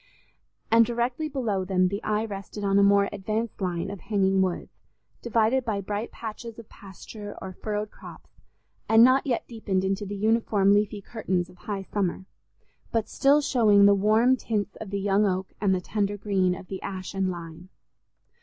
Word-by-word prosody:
And 230 0 +7
directly 245 +6 -2
below 230 -9 -1
them 185 -1 +2
the 200 +2 -4
eye 215 +1 -1
rested 205 0 -7
on 200 0 +3
a - - +5
more 200 0 +4
advanced 215 +3 -3
line 175 -2 -2
of 200 - -7
hanging 195 -2 +1
woods, 185 -2 -2 0.5
divided 235 +3 +2
by 220 -4 -2
bright 205 +3 -4
patches 230 0 -8
of 230 -2 -11
pasture 205 +1 -10
or 190 -1 -7
furrowed 210 +2 -4
crops, - - -14 0.5
and 225 +1 +7
not 260 +3 +4
yet 240 -3 -1
deepened 205 -5 -2
into 195 +2 -1
the 205 - -5
uniform 210 -1 +2
leafy 205 0 +1
curtains 185 -6 -2
of 180 - -19
high 200 -2 -2
summer, 190 -2 -2 0.7
but 225 -2 0
still 285 +2 +3
showing 215 -8 +4
the 200 - +7
warm 215 +6 +4
tints 210 -4 -3
of 215 - -8
the 200 0 -2
young 200 +1 +2
oak 185 0 -2
and 195 -2 +3
the - - -1
tender 205 +1 -2
green 190 -3 +1
of 185 - -10
the 190 0 -7
ash 185 -1 -6
and 195 -1 0
lime. 170 0 -8
205 Hz, 180 wpm, -26 LUFS, 190-225 Hz, 0.7 s, And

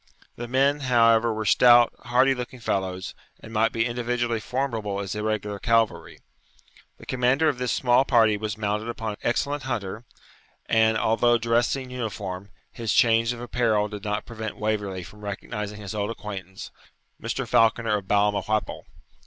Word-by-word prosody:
The 120 - -6
men, 135 +4 +2
however, 115 -3 +3
were 110 0 -3
stout, 120 +2 +6
hardy 130 +3 +3
looking 125 0 -7
fellows, 95 -4 -3 0.3
and 115 - -12
might 115 +1 +2
be 115 0 0
individually 120 -1 -1
formidable 115 -5 -3
as 100 -1 -4
irregular 105 -1 -3
cavalry. 115 -1 0 0.8
The - - -14
commander 130 +5 +2
of 140 -5 0
this 125 -1 -1
small 125 0 +3
party 115 -5 +4
was 105 0 -4
mounted 105 +1 -2
upon 115 -2 -4
an 105 - -8
excellent 140 +4 -1
hunter, 110 -4 -4 0.6
and, 110 0 +3
although 115 +2 +3
dressed 115 +2 +1
in 130 -2 -7
uniform, 100 -6 -5 0.2
his 115 -3 -2
change 115 -2 +4
of 120 -1 -6
apparel 115 -4 0
did 105 -1 -8
not 105 -1 -2
prevent 110 -2 -6
Waverley 105 -3 -2
from 105 +5 -14
recognising 105 +1 -5
his 100 0 -7
old 105 0 -2
acquaintance, 100 -4 -7 0.5
Mr. - - -3
Falconer 115 -1 +3
of 95 - -14
Balmawhapple. 105 +1 0
115 Hz, 155 wpm, -25 LUFS, 105-120 Hz, 0.8 s, stout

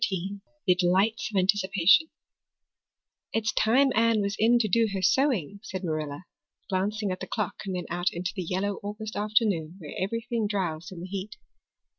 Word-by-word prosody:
The 185 - +6
Delights 185 +5 +2
of 205 - -3
Anticipation 195 - +4 1.3
IT'S 215 -1 +1
time 260 +5 +4
Anne 230 0 +3
was 200 0 -1
in 235 +2 +5
to 230 -2 +1
do 225 +3 +3
her 190 - -1
sewing," 205 - +2
said 190 -3 -6
Marilla, 155 -2 -3 0.5
glancing 200 +2 -1
at 185 - -4
the - - -6
clock 210 -5 -3
and 190 - -2
then 180 - -3
out 175 +1 0
into 175 +2 -3
the 190 - -2
yellow 190 +3 -1
August 210 +1 -6
afternoon 205 -6 +1
where 155 -6 -9
everything 230 +3 -1
drowsed 180 -3 -2
in 175 -2 -8
the 180 - -6
heat. 195 +3 -5
200 Hz, 165 wpm, -27 LUFS, 180-220 Hz, 1.3 s, The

